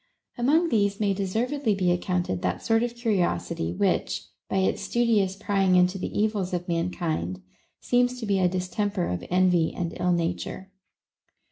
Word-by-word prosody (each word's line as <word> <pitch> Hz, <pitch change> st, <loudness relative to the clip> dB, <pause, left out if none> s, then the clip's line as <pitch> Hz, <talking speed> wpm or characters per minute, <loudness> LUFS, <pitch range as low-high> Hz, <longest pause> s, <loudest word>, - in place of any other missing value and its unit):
Among 305 Hz, +8 st, +2 dB
these 200 Hz, -5 st, +1 dB
may 205 Hz, -2 st, +2 dB
deservedly 220 Hz, +5 st, -1 dB
be 180 Hz, -2 st, +1 dB
accounted 175 Hz, -, -1 dB
that 90 Hz, 0 st, -2 dB
sort 225 Hz, 0 st, +2 dB
of 240 Hz, 0 st, -2 dB
curiosity, 180 Hz, -, -1 dB
which, 90 Hz, -, 0 dB, 0.2 s
by -, -, 0 dB
its 190 Hz, -, +1 dB
studious 220 Hz, -6 st, +1 dB
prying 195 Hz, -2 st, +1 dB
into 180 Hz, +1 st, +3 dB
the -, -, -3 dB
evils 205 Hz, -4 st, 0 dB
of 175 Hz, 0 st, -4 dB
man 170 Hz, 0 st, 0 dB
kind, 95 Hz, -, -3 dB, 0.4 s
seems 245 Hz, 0 st, +1 dB
to 230 Hz, -, -4 dB
be 200 Hz, -2 st, +1 dB
a 180 Hz, -1 st, +3 dB
distemper 185 Hz, +1 st, -1 dB
of 90 Hz, 0 st, -3 dB
envy 180 Hz, -2 st, +3 dB
and 170 Hz, -1 st, -3 dB
ill 180 Hz, -, +2 dB
nature. 175 Hz, +2 st, -3 dB
190 Hz, 160 wpm, -26 LUFS, 175-220 Hz, 0.4 s, into